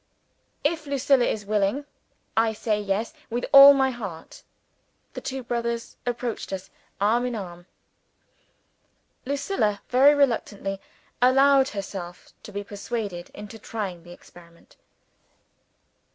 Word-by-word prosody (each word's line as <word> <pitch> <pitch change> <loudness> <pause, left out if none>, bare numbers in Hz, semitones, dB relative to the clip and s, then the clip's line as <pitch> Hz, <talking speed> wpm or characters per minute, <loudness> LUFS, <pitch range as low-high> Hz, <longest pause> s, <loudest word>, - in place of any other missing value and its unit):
"If 310 0 -1
Lucilla 275 -2 +3
is 210 -2 -2
willing, 210 +7 0 0.5
I 225 0 +2
say 215 -1 -1
Yes, 205 +3 -2 0.2
with 240 +1 -2
all 280 +1 +11
my 265 -1 +2
heart." 200 -10 -8 0.7
The - - -6
two 265 -1 -5
brothers 235 -1 -3
approached 240 -3 -3
us, 190 -1 -6 0.3
arm 220 +5 +2
in 245 - -3
arm. 175 -4 -8 1.6
Lucilla, 275 - -1
very 275 +4 +6
reluctantly, 205 -8 0 0.4
allowed 270 +1 +5
herself 190 -3 -7
to - - -11
be 205 0 -4
persuaded 200 -3 -5
into 210 +2 -9
trying 200 -6 -5
the 175 +1 -14
experiment. 170 -1 -17
225 Hz, 115 wpm, -25 LUFS, 200-260 Hz, 1.6 s, all